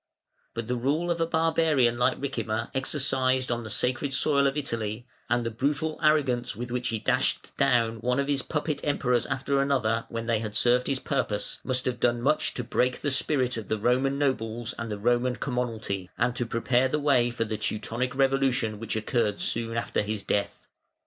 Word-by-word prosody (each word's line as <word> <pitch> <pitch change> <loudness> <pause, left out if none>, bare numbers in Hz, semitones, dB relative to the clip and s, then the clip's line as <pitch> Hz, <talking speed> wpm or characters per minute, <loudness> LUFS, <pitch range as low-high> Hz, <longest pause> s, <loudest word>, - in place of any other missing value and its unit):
But 115 -1 -4
the 125 - 0
rule 145 +8 0
of 170 -1 -1
a 165 - +2
barbarian 160 -7 +2
like 125 - +1
Ricimer 115 -5 -3
exercised 130 -2 +1
on 120 0 -1
the 110 - -7
sacred 130 +5 0
soil 140 -1 +4
of 135 +2 -1
Italy, 115 -5 -3 0.2
and 120 0 +2
the 115 - -2
brutal 145 +6 -1
arrogance 140 -8 +2
with 120 +3 -6
which 125 0 -1
he 115 - -1
dashed - - 0
down 115 -4 +2
one 125 +4 0
of 140 - 0
his 140 -2 +1
puppet 150 +1 -2
Emperors 125 -4 +1
after 135 +1 0
another 115 -5 0
when 115 -1 -4
they 115 -2 +1
had 105 -1 -5
served 125 +3 +3
his 135 - 0
purpose, 130 -7 -2
must 130 -1 -1
have 125 -2 -1
done 120 0 +2
much 140 +6 +1
to - - -2
break 125 0 0
the 145 - 0
spirit 130 -2 +1
of 110 -4 -6
the 110 - 0
Roman 130 +5 +1
nobles 120 -5 -1
and 115 -1 -4
the 105 - -3
Roman 120 +3 +1
commonalty, 115 -8 -3
and 125 - +1
to 120 -1 -2
prepare 120 +3 +2
the 150 - 0
way 140 -5 +3
for 120 -1 -2
the 110 -1 -3
Teutonic 115 +5 -2
revolution 135 -5 +1
which 115 -1 -3
occurred 110 -1 0
soon 115 0 -1
after 115 - 0
his 105 -1 -3
death. 100 - -2
125 Hz, 195 wpm, -27 LUFS, 115-135 Hz, 0.2 s, soil